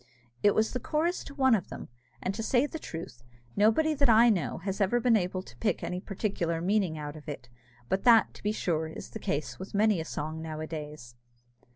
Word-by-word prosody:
_" - - -27 0.4
It 205 - +4
was 220 0 +2
the 250 - -1
chorus 320 +8 -1
to 280 - -10
one 265 -3 +4
of 195 -6 +1
them; - - -8 0.4
and, 185 - -1
to 220 - -4
say 245 +4 +2
the 320 +2 -6
truth, 160 - -8 0.3
nobody 225 +10 +3
that 280 -3 +2
I 230 +1 +7
know 175 -9 -1
has 195 +3 -4
ever 200 +5 +3
been 240 -1 +4
able 185 -2 -1
to - - -14
pick 220 - -1
any 180 - -3
particular 185 -4 -2
meaning 185 -2 +1
out 150 0 -6
of 155 0 -10
it; 125 -4 -7 0.4
but 190 +7 0
that, 235 -3 +6
to - - -14
be 210 - 0
sure, 160 -6 -1
is 160 - -9
the - - -6
case 125 -5 -3
with 190 - -7
many 210 -4 +3
a - - -6
song 155 +1 -4
nowadays. 155 -5 -6
195 Hz, 220 wpm, -29 LUFS, 160-225 Hz, 0.4 s, I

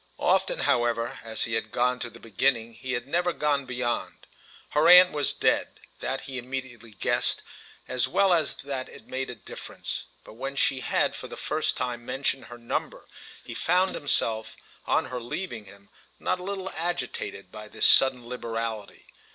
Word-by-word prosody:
Often, - - +2
however, 120 -1 +1
as 110 -1 -1
he 115 - -2
had 110 -1 -1
gone 125 +1 +1
to 120 - -2
the 115 +1 -14
beginning 115 +2 +1
he 130 +2 -5
had 120 +1 -2
never 175 +4 +2
gone 145 -4 0
beyond. 125 -1 -2 0.4
Her 150 +2 +3
aunt 180 +1 +10
was 145 -2 +1
dead—that 135 +1 -1
he 130 -2 -5
immediately 125 -2 -6
guessed, 100 - 0 0.4
as 130 0 +1
well 190 +7 +4
as 165 -2 +2
that 135 -2 -5
it - - -12
made 130 0 -3
a 125 - -5
difference; 105 - -6 0.2
but - - -13
when 135 +4 -4
she 135 -1 +2
had - - +1
for - - -7
the - - -9
first - - -1
time 120 -2 -3
mentioned 135 +1 -1
her 120 - -10
number 115 0 -3 0.4
he - - -7
found 185 +2 +2
himself, 115 -6 +1 0.3
on - - +2
her 125 -1 -5
leaving 120 - -4
him, 100 +1 -15 0.3
not 180 - 0
a - - -8
little 190 0 -4
agitated 175 +2 -3
by 105 0 -9
this - - 0
sudden 125 -3 +5
liberality. 115 -3 -4
125 Hz, 170 wpm, -27 LUFS, 115-145 Hz, 0.4 s, aunt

